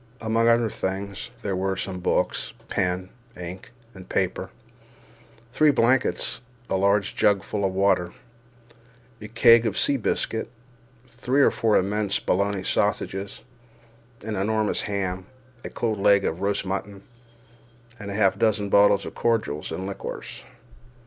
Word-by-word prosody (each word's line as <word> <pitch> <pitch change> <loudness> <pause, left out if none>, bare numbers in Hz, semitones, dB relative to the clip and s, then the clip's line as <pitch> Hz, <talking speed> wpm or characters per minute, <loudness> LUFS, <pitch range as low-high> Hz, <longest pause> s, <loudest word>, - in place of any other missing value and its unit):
Among 115 +1 +1
other 115 -2 +3
things, 100 +3 -4
there 100 -2 -1
were 95 +1 -1
some 95 -1 -4
books, - - -1 0.2
pen, 90 0 -1 0.3
ink, 90 +1 -8 0.2
and 95 -1 -13
paper, 95 0 -1 1.0
three 155 +1 +4
blankets, 130 -1 +1 0.3
a - - +2
large 100 +1 +1
jug 100 -2 +3
full 100 +1 -3
of 95 - +1
water, 95 -2 +1 1.1
a 105 - -7
keg 115 +1 +5
of 105 - -2
sea 140 - +3
biscuit, 110 -1 -2 0.6
three 125 +3 +1
or - - +5
four 110 -2 +2
immense 100 +1 0
Bologna 100 0 0
sausages, 100 -1 -1 0.8
an 110 0 -4
enormous 110 +2 0
ham, 95 -2 -3 0.4
a - - -6
cold 110 -3 -2
leg 100 0 +4
of 85 +3 -2
roast 100 0 0
mutton, 100 +1 -5 1.0
and 100 -2 -7
half 100 -1 +2
a - - -15
dozen 105 -2 +1
bottles 100 0 +4
of - - -7
cordials 110 -12 -1
and 95 +4 -4
liqueurs. 100 0 -7
100 Hz, 135 wpm, -24 LUFS, 95-110 Hz, 1.1 s, keg